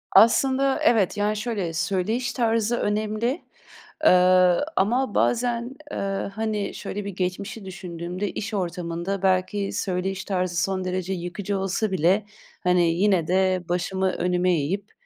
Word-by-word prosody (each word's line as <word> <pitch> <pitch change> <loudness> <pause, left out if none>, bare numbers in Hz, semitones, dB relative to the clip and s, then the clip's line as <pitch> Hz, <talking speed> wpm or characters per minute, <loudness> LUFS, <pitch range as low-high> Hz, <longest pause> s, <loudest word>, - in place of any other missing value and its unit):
Aslında, 265 +6 +5
evet. 220 - +3
Yani, 210 +1 0
şöyle, 205 -7 -2
söyleyiş 200 +8 -1
tarzı 230 -1 +1
önemli, 215 +7 -1 0.6
ııı, 180 +4 +5
ama 240 +4 +1
bazen, 240 +1 0 0.2
eee, 195 0 -2
hani, 215 -1 -2
şöyle 205 0 -5
bir - - -3
geçmişi 195 +3 -4
düşündüğümde 180 +1 -5
iş 215 +1 -5
ortamında 180 0 -3
belki 190 +2 +1
söyleyiş 190 0 -2
tarzı 180 -3 -1
son 185 0 -1
derece 185 +1 -2
yıkıcı 185 +3 -3
olsa 195 +2 -1
bile 190 +4 +2 0.4
hani, 180 -2 +3
yine 185 -3 +2
de 185 0 +2
başımı 190 +2 0
önüme 180 +1 +1
eğip, 185 +7 -2
195 Hz, 130 wpm, -24 LUFS, 180-215 Hz, 0.6 s, Aslında